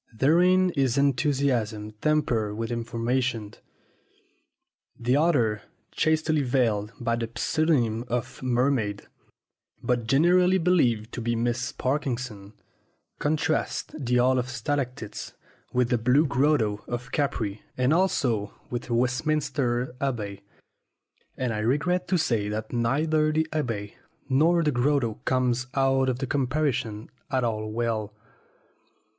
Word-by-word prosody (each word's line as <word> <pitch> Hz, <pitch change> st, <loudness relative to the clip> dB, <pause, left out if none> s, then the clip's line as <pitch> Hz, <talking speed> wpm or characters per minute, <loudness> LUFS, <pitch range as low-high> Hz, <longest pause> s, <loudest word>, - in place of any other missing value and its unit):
Therein 180 Hz, +8 st, +4 dB
is 135 Hz, -5 st, +1 dB
enthusiasm 130 Hz, -6 st, +1 dB
tempered 120 Hz, -9 st, +1 dB
with 115 Hz, +1 st, -3 dB
information. 115 Hz, -1 st, -2 dB, 1.5 s
The 120 Hz, +2 st, +1 dB
author 130 Hz, -9 st, +2 dB, 0.3 s
(chastely 155 Hz, -1 st, +1 dB
veiled 115 Hz, -5 st, +1 dB
by 115 Hz, -1 st, 0 dB
the 115 Hz, -1 st, -3 dB
pseudonym 125 Hz, -9 st, +1 dB
of 120 Hz, -1 st, -3 dB
"Mermaid," 125 Hz, -5 st, 0 dB, 0.8 s
but 120 Hz, -2 st, 0 dB
generally 180 Hz, +8 st, +4 dB
believed 125 Hz, -, +2 dB
to 120 Hz, -, -4 dB
be 120 Hz, 0 st, 0 dB
Miss 120 Hz, +1 st, -1 dB
Parkinson) 125 Hz, -7 st, -3 dB, 0.7 s
contrasts 155 Hz, +1 st, -1 dB
the 125 Hz, -4 st, -1 dB
Hall 130 Hz, +1 st, +4 dB
of 125 Hz, +1 st, -3 dB
Stalactites 130 Hz, -5 st, -4 dB, 0.4 s
with 125 Hz, -1 st, +1 dB
the 120 Hz, -2 st, +2 dB
Blue 130 Hz, +7 st, +4 dB
Grotto 135 Hz, -7 st, +1 dB
of 120 Hz, 0 st, -5 dB
Capri 125 Hz, -9 st, -1 dB, 0.2 s
and 130 Hz, +3 st, +3 dB
also 135 Hz, -, +1 dB, 0.2 s
with 120 Hz, +1 st, -4 dB
Westminster 125 Hz, 0 st, 0 dB
Abbey; 105 Hz, -8 st, -3 dB, 1.0 s
and 125 Hz, -3 st, -1 dB
I 105 Hz, -, -2 dB
regret 165 Hz, +11 st, 0 dB
to 185 Hz, -, +2 dB
say 115 Hz, -10 st, 0 dB
that 110 Hz, +2 st, -4 dB
neither 155 Hz, +6 st, +1 dB
the 155 Hz, +1 st, +1 dB
Abbey 115 Hz, -9 st, -3 dB, 0.3 s
nor 160 Hz, +6 st, +3 dB
the 150 Hz, -, +2 dB
Grotto 120 Hz, -3 st, 0 dB
comes 130 Hz, -1 st, +1 dB
out 135 Hz, -1 st, +2 dB
of 125 Hz, -, -1 dB
the 135 Hz, -, -2 dB
comparison 130 Hz, -6 st, -1 dB, 0.2 s
at 130 Hz, -2 st, 0 dB
all 110 Hz, -2 st, -2 dB
well. 110 Hz, -2 st, -2 dB
125 Hz, 120 wpm, -26 LUFS, 115-145 Hz, 1.5 s, Therein